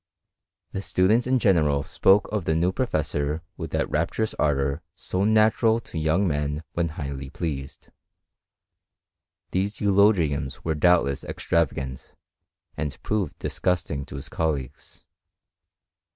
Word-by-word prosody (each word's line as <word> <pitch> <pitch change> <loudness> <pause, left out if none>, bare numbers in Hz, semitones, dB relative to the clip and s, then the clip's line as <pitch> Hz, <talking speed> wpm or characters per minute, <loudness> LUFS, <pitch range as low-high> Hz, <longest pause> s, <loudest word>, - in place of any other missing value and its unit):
The 95 - -3
students 105 +6 +2
in 130 0 +3
general 75 - +3
spoke 95 +7 +3
of 105 -5 -2
the 80 - +1
new 85 +3 +2
professor 80 - -1
with - - -6
that - - 0
rapturous 85 +8 -1
ardour 70 0 +1
so 95 +2 -1
natural 110 +1 +4
to 80 - -6
young 80 +6 +2
men 75 0 -1
when 85 -1 0
highly 70 -3 -6
pleased. 70 -4 -5 1.6
These 100 +3 0
eulogiums 95 - +2
were 80 - 0
doubtless 75 -4 +3
extravagant, 65 -6 -2 0.6
and 75 -3 -3
proved 105 -7 -1
disgusting 80 -6 -1
to - - -9
his 70 - -6
colleagues. 75 -6 -4
80 Hz, 120 wpm, -25 LUFS, 70-95 Hz, 1.6 s, natural